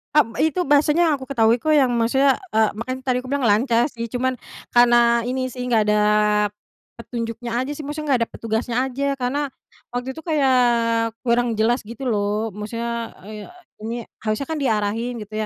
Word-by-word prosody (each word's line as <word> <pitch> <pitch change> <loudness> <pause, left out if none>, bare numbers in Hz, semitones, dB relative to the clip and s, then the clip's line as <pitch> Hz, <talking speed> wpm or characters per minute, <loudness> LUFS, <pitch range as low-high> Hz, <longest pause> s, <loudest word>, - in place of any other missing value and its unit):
Kan 235 -6 +3
itu 320 +3 +1
bahasanya 295 +3 +4
yang 310 - +3
aku 265 - -9
ketahui 225 -2 +4
kok 310 +6 -1
yang 270 -5 +4
maksudnya, 265 +4 +3 0.2
eee, 220 -1 +3
makanya 255 +4 -4
tadi 250 -1 +2
aku 255 - -9
bilang 275 -4 +1
lancar 235 +3 +3
sih 230 -4 -7
cuman, 255 +1 -1 0.4
karena 240 -1 +5
ini 255 +1 -2
sih 250 0 -6
nggak 235 -3 +2
ada, 210 - +3 1.0
petunjuknya 230 0 -5
aja 285 - -5
sih 300 - -7
maksudnya 300 +1 -5
gak 245 - +3
ada - - -45
petugasnya 230 +1 -3
aja 265 +1 -3
karena, 275 +3 -1 0.5
waktu 250 +2 -2
itu 320 - -10
kayak 280 -6 +2 0.6
kurang 235 -1 +1
jelas 240 +3 +2
gitu 235 +3 -8
loh 210 +1 -1
maksudnya, 230 +3 -5
eee, 210 0 -9 0.3
ini 230 +2 -4 0.2
harusnya 215 +5 -2
kan 310 - -2
diarahin 225 -1 0
gitu 210 +1 -17
240 Hz, 175 wpm, -22 LUFS, 230-265 Hz, 1.0 s, karena